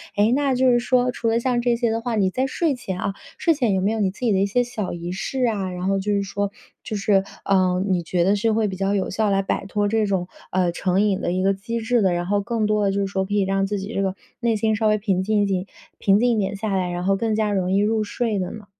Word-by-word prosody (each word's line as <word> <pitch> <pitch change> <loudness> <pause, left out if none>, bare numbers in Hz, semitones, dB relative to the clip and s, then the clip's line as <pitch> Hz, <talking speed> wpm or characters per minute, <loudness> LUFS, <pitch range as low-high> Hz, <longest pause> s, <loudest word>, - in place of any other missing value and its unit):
哎， 210 +2 +3
那 275 -2 +1
就 255 0 +4
是 240 - +4
说 250 0 +2
除 235 - -3
了 225 +1 +2
像 245 0 0
这 240 0 +2
些 235 -1 0
的 225 +1 -1
话， 235 -1 -2
你 195 -3 +2
在 260 +6 0
睡 315 +3 0
前 190 -8 -5
啊， 195 - -2 0.2
睡 330 - +3
前 245 -9 +1
有 190 - 0
没 200 +3 +1
有 225 - -2
你 200 -3 +2
自 190 - -13
己 240 -3 +2
的 190 - +2
一 195 - +3
些 245 +5 +2
小 225 -5 -4
仪 175 0 -5
式 220 +8 -2
啊？ 200 -5 -2
然 180 +1 -4
后 195 0 +1
就 205 +2 -1
是 200 - +1
说 200 0 -2 0.3
就 215 - -4
是， 195 -1 +2 0.2
啊， 185 -2 +2
你 185 -3 +1
觉 170 +1 0
得 195 +3 +3
是 220 +2 +1
会 220 -1 +1
比 190 - -4
较 195 +1 0
有 190 - -1
效 215 +2 0
来 195 0 +2
摆 195 - -2
脱 205 +1 0
这 220 +1 +1
种 190 -3 -1 0.2
啊 180 -1 +1
成 185 +2 0
瘾 205 -2 +1
的 - - -1
一 185 +1 0
个 195 +1 +3
机 230 +4 -4
制 235 +1 +1
的， 190 -2 +3
然 175 0 -1
后 205 +1 +2
更 225 +1 -1
多 210 -1 +1
地 195 - +2
就 200 +1 0
是 195 - 0
说 190 -1 -1
可 205 - -5
以 205 - +3
让 195 0 +1
自 205 +1 -2
己 195 +4 -6
这 - - 0
个 190 -1 -1 0.2
内 235 -2 +1
心 220 +1 +1
稍 215 +1 +1
微 215 0 +3
平 195 -3 0
静 205 0 +2
静 190 -2 -1 0.3
平 195 0 +3
静 245 +1 +3
一 - - 0
点 195 0 -1
下 210 0 -3
来， 185 -1 0
然 175 0 -3
后 195 +1 +2
更 225 0 0
加 215 -1 0
容 185 -2 0
易 195 - +3
入 215 +1 +1
睡 220 0 -2
的 180 -1 -3
呢？ 215 -2 -9
205 Hz, 320 characters per minute, -22 LUFS, 190-225 Hz, 0.3 s, 就